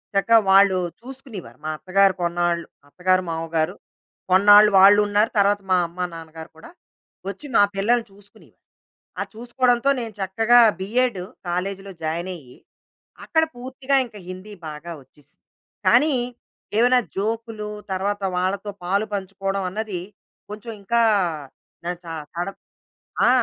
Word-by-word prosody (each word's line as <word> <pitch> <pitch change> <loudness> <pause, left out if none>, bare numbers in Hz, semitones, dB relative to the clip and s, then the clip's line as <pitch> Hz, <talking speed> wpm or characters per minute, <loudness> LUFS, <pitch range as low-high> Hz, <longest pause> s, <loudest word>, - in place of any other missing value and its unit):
చక్కగా 210 +4 +5
వాళ్ళు 195 -1 +6 0.2
చూసుకునేవారు. 255 - -10
మా - - -2
అత్తగారు 195 +3 +3
కొన్నాళ్ళు 170 -1 0 0.2
అత్తగారు, 185 +3 +1
మామగారు 165 +2 -2 0.6
కొన్నాళ్ళు 205 +3 +7
వాళ్ళు 200 +2 +8
ఉన్నారు. 205 +2 +2
తర్వాత 200 0 +3
మా 185 - +5
అమ్మ, 170 +2 -16
నాన్నగారు 160 0 -10
కూడా 160 - -13 0.6
వచ్చి 290 - -8
మా 205 - +7
పిల్లల్ని 230 +4 +1
చూసుకునేవారు. 205 0 -21 0.6
ఆ - - 0
చూసుకోవడంతో, 245 +2 +1
నేను 225 -2 -6
చక్కగా 225 +6 +4 0.2
బిఏడ్ 220 +1 0 0.3
కాలేజ్‌లో 195 +2 -3
జాయిన్ 165 +3 -2
అయ్యి, 130 -7 -14 0.7
అక్కడ 320 0 +2
పూర్తిగా 260 +2 -2
ఇంక 225 -3 -13
హిందీ 185 +3 -9 0.2
బాగా 155 +3 -8
వచ్చేసింది. 145 +2 -24 0.4
కానీ, 300 -1 +5 0.6
ఏమైనా 250 +2 +5 0.2
జోకులు 220 +1 -3 0.2
తరువాత 200 +2 -2
వాళ్ళతో 195 +3 -1
పాలుపంచుకోవడం 195 0 -2
అన్నది 210 -1 -4 0.5
కొంచెం 210 +3 -7
ఇంకా 235 +4 +1 0.8
న - - -3 0.2
చ - - -20 0.3
తడం 175 +3 -3 0.7
ఆ! - - +6
200 Hz, 120 wpm, -22 LUFS, 180-225 Hz, 0.8 s, వాళ్ళు